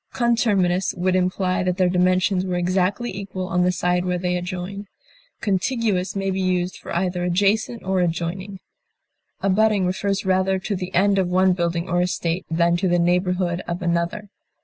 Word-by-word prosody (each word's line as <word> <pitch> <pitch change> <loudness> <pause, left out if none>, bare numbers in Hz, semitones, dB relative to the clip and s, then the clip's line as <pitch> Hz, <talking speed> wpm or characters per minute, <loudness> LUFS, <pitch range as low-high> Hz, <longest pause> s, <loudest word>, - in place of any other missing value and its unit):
Conterminous 205 -7 +1
would 185 +1 0
imply 185 0 0
that 180 0 -1
their 185 -2 +3
dimensions 185 +1 +2
were 185 -1 -2
exactly 185 +5 0
equal 190 -2 -5
on 180 -1 0
the 180 0 +3
side 180 0 0
where 180 -1 -1
they 180 0 -1
adjoin. 185 +3 -5 0.5
Contiguous 205 -1 0
may 195 -1 -1
be 190 0 -2
used 180 -1 0
for - - -10
either 180 0 -1
adjacent 205 +6 +1
or 190 0 0
adjoining. 180 +3 -3 0.8
Abutting 200 0 +2
refers 195 +2 -1
rather 190 0 +2
to 200 +2 -3
the 185 0 -5
end 195 +2 +3
of 185 - +1
one 185 +1 +3
building 170 -1 -1
or 175 +1 +1
estate 180 0 -2
than 170 +1 +2
to 185 +2 0
the 175 0 +2
neighborhood 180 0 +1
of 175 +1 -3
another. 170 +4 -1
185 Hz, 170 wpm, -22 LUFS, 180-195 Hz, 0.8 s, their